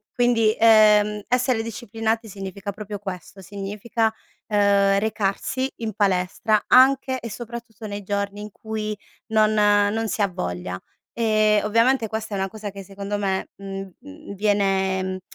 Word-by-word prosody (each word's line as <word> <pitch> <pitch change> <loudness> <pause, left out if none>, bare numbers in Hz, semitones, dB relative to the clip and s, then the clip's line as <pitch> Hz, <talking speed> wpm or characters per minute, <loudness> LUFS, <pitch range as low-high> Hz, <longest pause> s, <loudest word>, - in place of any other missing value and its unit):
Quindi, 230 -3 +3
ehm, 210 -2 +5
essere 250 -2 +1
disciplinati 225 0 -3
significa 195 0 -6
proprio 205 0 -7
questo, 195 0 -8
significa, 205 +4 -2 0.4
uhm, 200 -1 +3
recarsi 220 +5 -1
in 225 -2 -4
palestra 200 +2 +1
anche 260 0 +5
e 230 -2 -7
soprattutto 230 -1 -8
nei 205 0 -5
giorni 200 +1 -3
in 210 - -8
cui 215 0 -4 0.4
non 215 0 +4
non 205 +1 +3
si 215 - -3
ha 200 - +3
voglia. 90 - -4 0.4
Ehm, 215 -2 +3
ovviamente 230 +2 +2
questa 220 -1 -4
è - - -2
una 195 0 -1
cosa 215 0 -7
che 195 0 -9
secondo 200 +1 -5
me, 195 -2 -1
mhmm, 195 -1 -7
mhmm, 285 -6 -11
viene 190 -2 0
210 Hz, 140 wpm, -23 LUFS, 195-225 Hz, 0.4 s, ehm